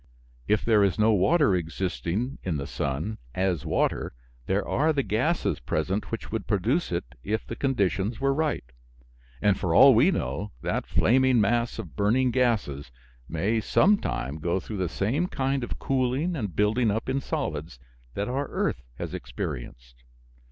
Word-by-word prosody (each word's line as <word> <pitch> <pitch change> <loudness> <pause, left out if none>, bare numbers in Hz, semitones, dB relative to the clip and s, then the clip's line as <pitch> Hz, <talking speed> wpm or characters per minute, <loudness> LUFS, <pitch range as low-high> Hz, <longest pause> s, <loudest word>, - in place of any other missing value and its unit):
If 105 0 +1
there 110 -3 +4
is 100 -3 +1
no 110 +1 +4
water 140 - +4
existing, 90 - -2
in 85 -5 -2
the 70 - -4
sun, 75 +10 -3 0.2
as 90 -4 0
water, - - 0 0.3
there 95 +1 0
are 155 +3 +2
the 140 -3 0
gases 130 +12 0
present 95 +7 -2
which 115 - -5
would 110 -4 -3
produce 110 - 0
it 85 -5 -1 0.2
if 110 +6 -2
the - - -6
conditions 105 - 0
were 135 0 +2
right. 155 +1 0 0.8
And, 100 -2 +3
for 90 -4 0
all 135 +7 +9
we 125 +10 +5
know, 105 - -2
that - - -1
flaming 130 0 +3
mass 115 +3 +1
of - - -7
burning 120 +5 +2
gases 105 - 0 0.4
may 105 +8 0
some 200 - +4
time 65 +3 -3
go 85 +4 0
through 105 +3 -6
the 90 -3 -1
same 130 - 0
kind 135 -4 -1
of 120 - -4
cooling 135 +6 0
and 105 - -4
building 110 +3 +2
up 110 +2 -2
in 135 +1 0
solids 80 - -4 0.4
that 100 - -2
our 135 +3 -2
earth - - -1
has - - -6
experienced. - - -6
110 Hz, 165 wpm, -26 LUFS, 90-130 Hz, 0.8 s, all